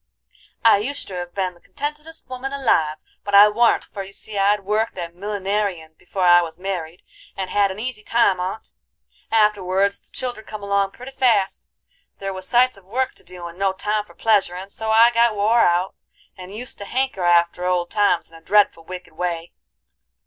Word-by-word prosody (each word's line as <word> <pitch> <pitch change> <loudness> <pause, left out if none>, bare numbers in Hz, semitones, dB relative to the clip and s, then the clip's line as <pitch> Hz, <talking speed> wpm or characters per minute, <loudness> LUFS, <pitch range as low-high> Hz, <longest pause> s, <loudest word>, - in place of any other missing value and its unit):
"I 205 -3 +6
oushter 230 -6 -4
hev 175 0 -7
been 185 -2 -1
the 175 - -22
contentedest 300 +2 -7
woman 260 +1 -5
alive, 165 - +1 0.3
but 205 0 0
I 205 +1 +9
warn't, 230 +2 +3
for 200 - -8
you 195 0 -9
see 215 +1 -6
I'd 200 +1 +2
worked 210 +2 -1
at 170 -1 -5
millineryin' 195 -3 -3
before 185 +3 -4
I 175 0 +7
was 165 -2 -6
married, 180 -3 -5 0.3
and 190 -1 -4
had 205 -1 +3
an 190 - -6
easy 230 0 -5
time 215 -4 +2
on't, 185 +5 -4 0.6
Afterwards 200 -2 +2
the - - -22
children 245 -4 -4
come 215 -1 -7
along 200 -1 +1
pretty 250 +2 -10
fast, 240 -7 +1 0.5
there 195 0 -4
was 185 0 -7
sights 250 -1 +3
of 195 - -18
work 255 +7 -1
to - - -10
do, 180 -1 -10
and 170 +1 -9
no 195 -1 +1
time 210 +2 -1
for 210 - -19
pleasuring 195 -4 +1
so 220 +2 -5
I 225 +2 +6
got 235 -1 +3
wore 220 +3 +3
out, 175 +2 +2 0.4
and 185 0 -10
used 235 +5 -4
to 200 - -6
hanker 260 -4 -1
after 175 0 +3
old 180 -1 0
times 200 -6 +1
in - - -15
a 165 - -13
dreadful 200 -3 +3
wicked 180 0 -9
way. 170 0 -3
200 Hz, 190 wpm, -22 LUFS, 180-220 Hz, 0.6 s, I